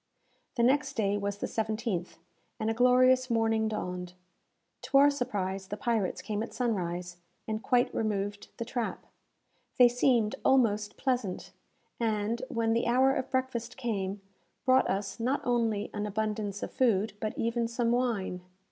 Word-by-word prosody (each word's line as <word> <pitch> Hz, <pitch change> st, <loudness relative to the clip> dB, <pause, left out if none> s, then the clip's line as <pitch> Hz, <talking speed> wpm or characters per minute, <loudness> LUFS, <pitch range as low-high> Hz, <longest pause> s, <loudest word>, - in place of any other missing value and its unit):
The 235 Hz, -, +1 dB
next 270 Hz, +2 st, +3 dB
day 205 Hz, -5 st, +1 dB
was 200 Hz, 0 st, -2 dB
the -, -, -3 dB
17th, 220 Hz, -4 st, -2 dB, 0.4 s
and 220 Hz, +1 st, 0 dB
a -, -, 0 dB
glorious 255 Hz, +2 st, +4 dB
morning 225 Hz, -1 st, +2 dB
dawned. 180 Hz, -4 st, -4 dB, 0.7 s
To 275 Hz, -, +2 dB
our 285 Hz, +1 st, +7 dB
surprise, 195 Hz, -8 st, -3 dB
the 205 Hz, -, -5 dB
pirates 220 Hz, -4 st, -1 dB
came 210 Hz, -1 st, -2 dB
at 230 Hz, -, -6 dB
sunrise, 180 Hz, -7 st, -2 dB, 0.3 s
and 215 Hz, 0 st, -2 dB
quite 245 Hz, 0 st, +2 dB
removed 205 Hz, -2 st, -2 dB
the 230 Hz, -, -3 dB
trap. 240 Hz, -1 st, -3 dB, 0.7 s
They 250 Hz, -, +8 dB
seemed 240 Hz, -3 st, +2 dB
almost 215 Hz, -6 st, +2 dB
pleasant, 245 Hz, -8 st, -2 dB, 0.5 s
and, 220 Hz, 0 st, 0 dB
when 230 Hz, -3 st, +1 dB
the 230 Hz, +1 st, +1 dB
hour 260 Hz, +3 st, +4 dB
of 260 Hz, -, -2 dB
breakfast 260 Hz, -3 st, -2 dB
came, 205 Hz, -6 st, -2 dB, 0.4 s
brought 260 Hz, 0 st, +4 dB
us 195 Hz, +1 st, -2 dB
not 255 Hz, +5 st, 0 dB
only 230 Hz, -4 st, 0 dB
an 210 Hz, 0 st, -2 dB
abundance 210 Hz, -1 st, -2 dB
of -, -, -4 dB
food, 225 Hz, -4 st, +2 dB
but 215 Hz, 0 st, -3 dB
even 230 Hz, 0 st, 0 dB
some 235 Hz, 0 st, 0 dB
wine. 230 Hz, -7 st, 0 dB
225 Hz, 150 wpm, -29 LUFS, 205-245 Hz, 0.7 s, They